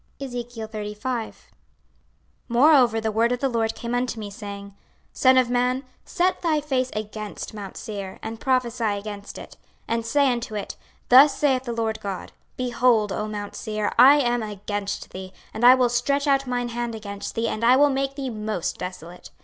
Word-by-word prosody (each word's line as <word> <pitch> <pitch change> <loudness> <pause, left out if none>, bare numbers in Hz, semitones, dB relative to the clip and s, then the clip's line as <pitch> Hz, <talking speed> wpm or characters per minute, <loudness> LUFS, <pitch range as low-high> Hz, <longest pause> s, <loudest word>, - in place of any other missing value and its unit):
26:035:001 230 -2 -5 1.2
Moreover 245 -2 +5
the 220 0 -1
word 230 +3 +2
of 250 - -1
the 275 - +1
LORD 225 -3 -1
came 235 0 -5
unto 245 -2 -1
me, 205 -2 -6
saying, 200 -1 -8 0.4
26:035:002 - - -18
Son 260 0 +5
of 255 -2 +3
man, 250 +2 +1 0.2
set 365 0 0
thy 320 -3 +2
face 265 -4 -1
against 215 0 -6
mount 205 -2 -8
Seir, 200 -3 -6
and 220 0 -6
prophesy 250 -2 0
against 205 0 -8
it, - - -11 0.3
26:035:003 - - -1
And 230 0 -1
say 280 +2 +3
unto 235 -3 -4
it, 205 - -5 0.3
Thus 270 +2 +7
saith 265 -3 +1
the 240 - -3
Lord 225 -1 -2
GOD; 195 -2 -5 0.3
Behold, 240 -4 +2
O 210 +2 -2
mount 205 -1 -6
Seir, 215 -1 -2
I 265 +4 +9
am 240 -3 +1
against 205 -1 -5
thee, 185 0 -8 0.2
and 220 - -5
I 250 +1 +9
will 255 -1 +3
stretch 280 +4 0
out 275 -2 +2
mine 245 -1 -1
hand 240 -1 -3
against 200 -2 -7
thee, 230 0 0
and 215 - -3
I 245 +2 +6
will 290 +1 +5
make 270 0 -1
thee 270 -3 -4
most 215 -5 -3
desolate. 180 -1 -8
235 Hz, 180 wpm, -24 LUFS, 210-255 Hz, 1.2 s, I